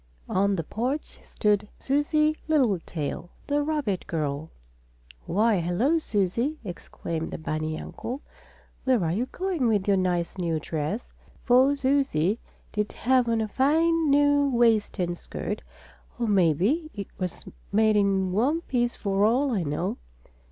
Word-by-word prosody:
On 200 +1 +2
the 165 - -2
porch 255 - -3
stood 210 -1 0
Susie 305 +2 +2
Littletail, 185 - 0 0.2
the 290 0 +1
rabbit 290 - -1
girl. 150 -1 -2 0.8
"Why, 210 +2 +3
hello 215 - +1
Susie!" 235 - 0
exclaimed 165 -2 -5
the - - -5
bunny 155 0 -3
uncle. 255 +5 -6 0.6
"Where 255 -9 +2
are 160 - 0
you 230 +9 -1
going 360 -8 -1
with 210 -3 +1
your 200 -1 +4
nice 180 0 -1
new 165 -3 0
dress?" 160 +9 -4 0.3
for 260 +3 +5
Susie 260 - +1 0.3
did 210 0 -1
have 250 -1 +2
on 225 -1 +1
a 220 - -1
fine 320 +6 +2
new 285 0 +4
waist 230 -5 +2
and 175 -2 -1
skirt, - - -5 0.6
or 240 - -1
maybe 200 - +2
it 200 -2 -6
was 180 -2 -4 0.3
made 215 +1 +4
in 195 -2 +2
one 265 - +1
piece 240 -5 0
for 200 -1 0
all 255 +6 +3
I 210 -6 +1
know. 155 +3 -2
215 Hz, 140 wpm, -26 LUFS, 180-275 Hz, 0.8 s, for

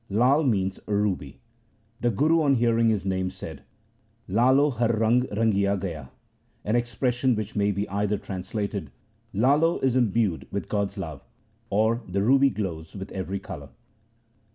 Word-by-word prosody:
Lai 125 +9 +3
means 95 -9 0
a 105 - 0
ruby. 95 -9 -2 0.6
The 120 - +1
Guru 155 +9 +3
on 140 -3 +3
hearing 115 -1 +3
his 105 -3 0
name 95 -1 0
said, 80 -6 -9 0.4
' - - -40 0.3
Lalo 130 +8 +4
Har 120 -2 0
rang 115 +3 +2
rangia 100 -2 +1
gay 95 -2 -3
a,' 70 -5 -10 0.6
an 105 - +1
expression 120 +1 +1
which 110 0 -5
may 100 -1 +2
be 100 +1 -2
either 100 +1 -1
translated 100 +2 -4 0.2
— 115 +1 -39
Lalo 155 +5 +4
is 130 -2 +2
imbued 115 -7 +1
with 100 -5 -4
God's 100 -2 -1
love, 80 -7 -6 0.5
or 110 +4 +2
— - - -18
the 100 +2 0
ruby 135 +4 +5
glows 85 -9 -5
with 95 0 -7
every 95 0 -3
colour. 75 -8 -8
105 Hz, 165 wpm, -26 LUFS, 95-120 Hz, 0.6 s, ruby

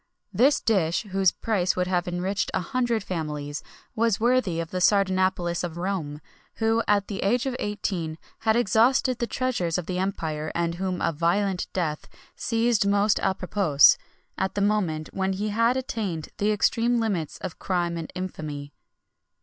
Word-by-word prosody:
This 275 +4 +4
dish, 180 -6 +1
whose 190 -1 +3
price 190 -5 0
would 180 - +1
have 180 -1 0
enriched 185 +3 -1
a - - +2
hundred 235 +3 -1
families, 150 -5 -4 0.3
was 230 -2 +2
worthy 235 -7 +2
of 165 -1 -4
the 185 - -2
Sardanapalus 185 -3 +2
of 170 -1 -4
Rome, 175 -5 -3 0.3
who, 225 0 +2
at 205 -1 +2
the 200 - -5
age 240 +6 +1
of 265 -2 -2
eighteen, 180 -6 -3 0.2
had 220 -1 +2
exhausted 240 +3 +3
the 235 - -1
treasures 230 -12 -1
of 180 - -3
the 180 +1 -2
empire, 160 -5 -2
and 170 0 0
whom 185 0 -3
a - - +2
violent 180 +4 0
death 155 -5 -2 0.3
seized 230 -3 +1
most 205 +1 +3
à 190 -1 0
propos, 175 -7 +5 0.4
at 190 0 -1
the 205 - 0
moment 185 -7 0
when 190 0 0
he 205 +3 -2
had 230 +4 +2
attained 205 -11 -3
the 205 +1 +2
extreme 230 +3 +2
limits 190 -9 -2
of 185 -3 -7
crime 175 -2 -1
and 165 -2 -5
infamy. 150 -6 -5
190 Hz, 165 wpm, -25 LUFS, 170-220 Hz, 0.4 s, propos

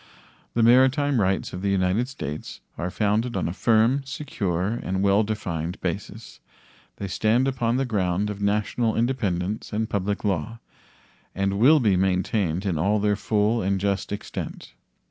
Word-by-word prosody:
The 115 - +3
maritime 130 +2 +4
rights 95 0 0
of 90 - -5
the 100 - 0
United 95 +5 +1
States 75 - -6 0.2
are 85 +4 -3
founded 105 +3 0
on 90 - -1
a 85 - -3
firm, 115 +6 +3
secure, 105 - -2
and 95 +1 -2
well 100 +1 +4
defined 90 -6 -3
basis; - - -5 0.6
they 100 - -5
stand 110 +8 +2
upon 120 -2 0
the 135 - 0
ground 100 -3 0
of 100 0 -7
national 105 +3 0
independence 105 -5 -1
and 110 +1 -1
public 100 -1 -2
law, 105 +3 -2 0.8
and 100 +1 0
will 150 +7 +6
be 105 -7 +3
maintained 95 -1 0
in 90 -6 0
all 100 +6 +2
their 105 0 +2
full 105 +2 +1
and 95 0 0
just 100 0 -1
extent. 105 - -6
105 Hz, 155 wpm, -24 LUFS, 95-115 Hz, 0.8 s, will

